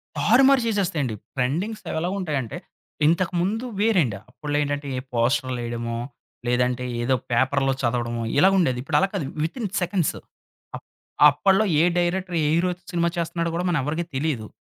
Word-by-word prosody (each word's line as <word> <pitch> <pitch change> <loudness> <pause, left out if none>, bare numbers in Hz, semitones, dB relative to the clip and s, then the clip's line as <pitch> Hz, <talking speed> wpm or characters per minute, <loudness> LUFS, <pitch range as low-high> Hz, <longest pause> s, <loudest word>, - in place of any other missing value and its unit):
తారుమారు 265 +3 +5
చేసేస్తాయండి. 170 - 0 0.2
ట్రెండింగ్స్ 175 - -1
అవెలా 165 +3 -1
ఉంటాయంటే, 145 - -3 0.5
ఇంతకముందు 185 +6 0
వేరండి 190 - +3 0.2
అప్పుడ్లో 145 +3 -3
ఏంటంటే, 145 0 -3
ఏ - - -1
పోస్టర్‌లేయడమో, 120 -1 -1 0.5
లేదంటే 125 +1 +1 0.2
ఏదో 130 +2 +2 0.2
పేపర్‌లో 135 +2 +2
చదవడమో 120 -1 -1
ఇలాగుండేది. 180 -8 +4
ఇప్పుడు 150 0 +1
అలా 195 - +3
కాదు, 185 -8 -2 0.2
వితిన్ 210 +7 -3
సెకండ్స్. 180 -2 0 0.6
అప్ - - -10 0.4
అప్పడ్లో 195 +8 +3 0.2
ఏ - - +4 0.2
డైరెక్టరు 180 0 -1
ఏ - - +2
హీరోతో 180 +1 0
సినిమా 170 -1 +1
చేస్తన్నాడో 170 0 -1
కూడా 175 - -1
మనెవ్వరికీ 160 +2 -1
తెలీదు. 130 -6 -1
160 Hz, 130 wpm, -24 LUFS, 130-180 Hz, 0.6 s, తారుమారు